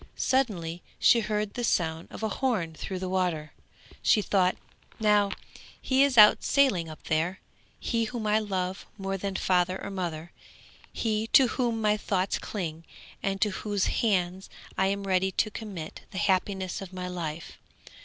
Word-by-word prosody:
Suddenly 180 -11 0 0.2
she 235 - +5
heard 210 -2 -2
the 245 - -4
sound 165 -6 0
of - - -9
a 220 - +1
horn 210 -9 -1
through 185 +4 -5
the 185 0 -4
water, 180 -5 -1 0.3
and - - -21
she 210 - +4
thought, 185 -2 +2 0.4
'Now 210 -2 +4 0.5
he 265 0 +2
is 275 -3 +1
out 210 -1 +8
sailing 205 - +2
up 155 - -11
there; 165 +4 0 0.4
he 230 -1 0
whom 230 -1 -5
I 210 +1 +3
love 190 -3 -3
more 195 -1 -3
than 195 0 -4
father 185 0 +1
or 200 - -6
mother, 175 -3 -4 0.6
he 220 -1 -1
to 260 -3 +7
whom 235 -3 -1
my 210 0 +3
thoughts 190 -2 -1
cling 165 -6 -5 0.4
and 195 0 -1
to 210 - +3
whose 205 0 -1 0.2
hands 190 -4 0 0.3
I 190 - +2
am 200 +1 -1
ready 190 0 +1
to 215 - +1
commit 195 -8 -7
the 195 - -8
happiness 190 0 0
of 190 -2 -8
my 180 -1 -4
life. 165 -3 -6
195 Hz, 165 wpm, -28 LUFS, 180-215 Hz, 0.6 s, out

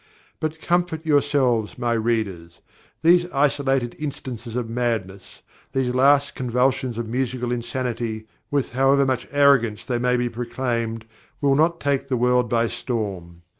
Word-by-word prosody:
But 155 0 -3
comfort 170 -1 0
yourselves, 140 -7 +2
my 120 -1 0
readers: 110 -7 -2 0.4
these 175 +1 +4
isolated 135 -3 +1
instances 125 -6 -6
of 125 -2 -2
madness, 115 -5 -3 0.3
these 130 -2 0
last 140 +2 +4
convulsions 125 0 0
of 115 -1 -3
musical 125 0 -2
insanity, 120 -2 -3 0.2
with 140 -2 -1
however 135 +2 +3
much 130 -3 -1
arrogance 140 -7 +3
they 120 -3 -1
may 125 +1 +2
be 120 0 0
proclaimed, 115 -1 -3 0.3
will 140 -1 +3
not 165 +4 +2
take 140 -1 0
the 130 - 0
world 125 0 +2
by 115 0 +2
storm. 95 -10 -4
125 Hz, 135 wpm, -23 LUFS, 115-140 Hz, 0.4 s, these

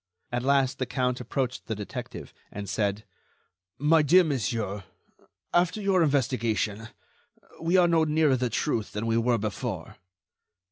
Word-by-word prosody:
At 120 0 -1
last, 135 0 +2
the 130 - -1
count 125 -1 -1
approached 130 +1 -3
the 110 - -2
detective, 105 -1 -7 0.2
and 100 0 -6
said: 100 0 -1 0.7
"My 155 +3 +4
dear 175 +5 +6
monsieur, 110 - -2 0.7
after 175 +4 +2
your 195 -3 +2
investigation, 115 - 0 0.7
we 170 +3 +2
are 180 -1 +5
no 165 -1 +3
nearer 155 -2 +3
the 125 -1 -1
truth 110 0 -1
than 105 +2 -3
we 115 0 +1
were 120 0 +2
before." 105 -3 -4
125 Hz, 140 wpm, -27 LUFS, 110-155 Hz, 0.7 s, dear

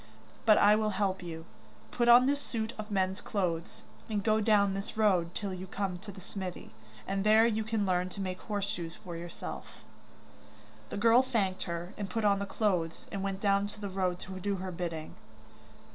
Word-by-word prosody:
But 215 - +8
I 205 +1 +6
will 215 0 +1
help 190 -2 0
you. 165 -2 -7 0.5
Put 240 -1 +1
on 245 +1 +9
this 285 +1 +1
suit 225 -3 -3
of 215 0 -5
men's 190 -1 0
clothes, 175 -5 -2 0.3
and 210 -2 -1
go 215 0 +3
down 205 -2 +4
this 195 +2 -5
road 185 -6 +2
till 200 -3 -3
you 185 +1 -6
come 185 -1 -3
to 205 +2 -9
the 190 - -11
smithy, 185 -1 -6 0.4
and 195 0 -1
there 215 +2 +6
you 220 -1 +1
can 220 -1 0
learn 180 -1 +1
to 200 - -9
make 185 -1 -3
horse 205 -2 -2
shoes 170 -3 -4
for 175 -2 -8
yourself.' 170 +1 -7 1.1
The - - -4
girl 230 +4 +6
thanked 200 -8 -1
her, 170 +1 -4
and 200 -2 -3
put 220 +3 -1
on 200 -1 +4
the 200 - -3
cloths 180 -7 -1
and 200 - -3
went 195 0 -3
down 200 0 +2
the 200 -1 -4
road 185 -2 0
to 190 -1 -7
do 200 +2 -1
her 185 0 -4
bidding. 165 -3 -4
195 Hz, 195 wpm, -31 LUFS, 185-215 Hz, 1.1 s, on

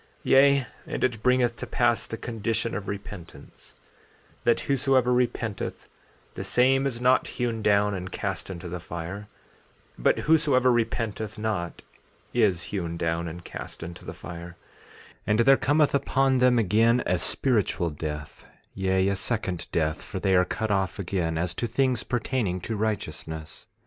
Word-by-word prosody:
14:18 - - -33 0.2
Yea, 140 -1 +6 0.2
and - - -3
it 120 -4 0
bringeth 125 0 +3
to - - -6
pass 120 -3 +1
the 115 - -5
condition 115 0 -2
of 105 -1 -4
repentance, 100 -3 -9 0.7
that 120 - +3
whosoever 135 -2 +2
repenteth 120 -3 -2 0.5
the - - -5
same 135 +2 +3
is 120 -3 -4
not 125 +1 +3
hewn 120 -3 -2
down 105 0 +3
and 95 0 -5
cast 95 -5 -3
into 90 -1 -6
the 90 +1 -5
fire; 85 +5 -6 0.7
but - - +2
whosoever 145 -5 +4
repenteth 110 -2 -1
not 105 -6 -3 0.5
is 100 -8 +2
hewn 85 -4 -2
down 85 0 -1
and 85 +1 -8
cast - - -8
into 85 +1 -8
the - - -6
fire; 85 0 -9 0.7
and 105 +2 +3
there 135 +3 +7
cometh 145 +2 +2
upon 135 -1 +2
them 125 -1 +5
again 115 +3 +3
a 90 -1 +1
spiritual 100 - 0
death, 75 0 -6 0.3
yea, 95 0 +1
a 100 - +1
second 95 -4 -2
death, 80 -1 0
for 95 - -6
they 95 0 +1
are 90 0 +5
cut 110 +3 -2
off 95 -2 0
again 85 -4 -1
as 85 +1 -1
to 120 - -2
things 125 0 +1
pertaining 120 -6 -1
to 110 +4 -4
righteousness. 80 -7 -4
105 Hz, 155 wpm, -26 LUFS, 90-125 Hz, 0.7 s, there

